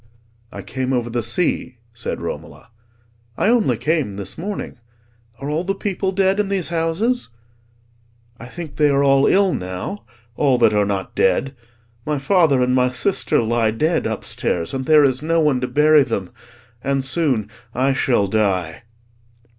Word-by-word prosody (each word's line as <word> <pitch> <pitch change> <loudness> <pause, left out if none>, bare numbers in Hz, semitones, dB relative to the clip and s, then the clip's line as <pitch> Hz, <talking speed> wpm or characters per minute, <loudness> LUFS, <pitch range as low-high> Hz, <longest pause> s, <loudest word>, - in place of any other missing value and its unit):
"I - - -8
came 130 0 -3
over 120 -2 -1
the 120 0 -1
sea," 125 +1 -2 0.2
said 115 - -5
Romola, - - -7 0.7
"I 205 - +2
only 235 -3 +2
came 150 -10 -1
this 100 -2 -6
morning. 195 -6 -6 0.6
Are 135 - -5
all 155 +3 -1
the 195 +2 -2
people 195 -1 -2
dead 195 +1 +1
in 210 - +1
these 195 -4 -1
houses?" 170 +10 -1 1.1
"I 125 - -9
think 155 +1 -9
they 150 -1 +4
are 140 0 +2
all 135 0 +4
ill 195 -1 +3
now—all 120 - -3
that 115 -3 +4
are 105 -1 +2
not 95 -2 -3
dead. 115 +9 +1 0.5
My 150 +2 -1
father 140 -2 +3
and 125 0 +1
my 125 0 +3
sister 125 +1 0
lie 115 0 +1
dead 155 +9 0
upstairs, 90 -5 -2
and 130 -1 -4
there 155 -1 +6
is 130 -1 +2
no 165 +2 +1
one 150 -5 +2
to 125 - -1
bury 150 +1 +5
them: 115 -8 -2 0.5
and 135 0 0
soon 135 -7 0 0.3
I 135 +2 +2
shall 120 -6 +1
die." 95 -4 -1
135 Hz, 160 wpm, -20 LUFS, 115-165 Hz, 1.1 s, there